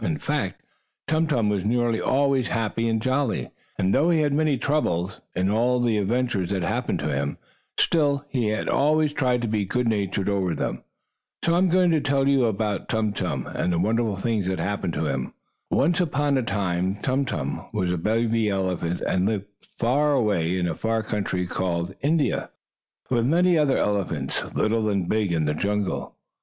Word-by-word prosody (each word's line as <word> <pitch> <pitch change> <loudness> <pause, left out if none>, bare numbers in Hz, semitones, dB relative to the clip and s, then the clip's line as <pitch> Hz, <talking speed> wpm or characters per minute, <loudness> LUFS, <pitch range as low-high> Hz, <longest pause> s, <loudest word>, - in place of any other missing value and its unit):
In 155 - 0
fact, 145 -11 -3 0.4
Tum 160 +2 +2
Tum 120 -8 +1
was 100 -3 0
nearly 115 +1 +1
always 135 -2 +2
happy 115 0 -1
and 110 0 +1
jolly, 130 +1 -1 0.3
and, 95 +1 +1
though 160 +4 +3
he 165 -2 +3
had 145 -2 +1
many 150 -2 +2
troubles, 105 - -1
in 95 +2 +1
all 120 +3 +2
the 115 -3 +2
adventures 105 -3 0
that 95 -3 -1
happened 110 +8 -1
to - - -1
him, 70 +1 -2 0.4
still, 145 -3 +2
he 125 -6 0
always 150 +7 +2
tried 125 -4 +1
to - - 0
be 105 -1 0
good 125 +5 -1
natured 100 -3 0
over 95 -4 0
them. - - -3 0.6
So 170 - +3
I 175 - +3
am 185 0 +3
going 180 0 +4
to 160 -2 +2
tell 140 -1 +1
you 135 -3 +4
all - - +3
about 105 -1 -2
Tum 110 -2 0
Tum, 80 -11 -2
and 90 - -2
the 85 - +1
wonderful 110 +3 +1
things 105 -1 -1
that 95 0 -1
happened 100 -4 -2
to 80 - -1
him. 70 -3 -2 0.4
Once 165 +6 +2
upon 145 -4 +1
a 130 - +2
time 95 -4 -1
Tum 130 +6 0
Tum 70 - -4
was 95 -4 -1
a 90 - 0
baby 110 +2 +1
elephant, 90 -3 -1
and 95 +1 +1
lived 105 -2 -1 0.3
away 120 - +2
off - - -1
in 90 - +1
a 85 - -1
far 110 +5 -1
country 100 -4 -2
called 90 0 -2
India, 150 +1 +1 0.6
with 120 -1 +2
many 175 +4 +4
other 150 -4 +3
elephants, 100 -2 -2
little 110 0 +1
and 100 -4 0
big, 105 -4 +1
in 80 -2 +1
the 75 - +1
jungle. 100 +4 -2
110 Hz, 190 wpm, -24 LUFS, 95-135 Hz, 0.6 s, going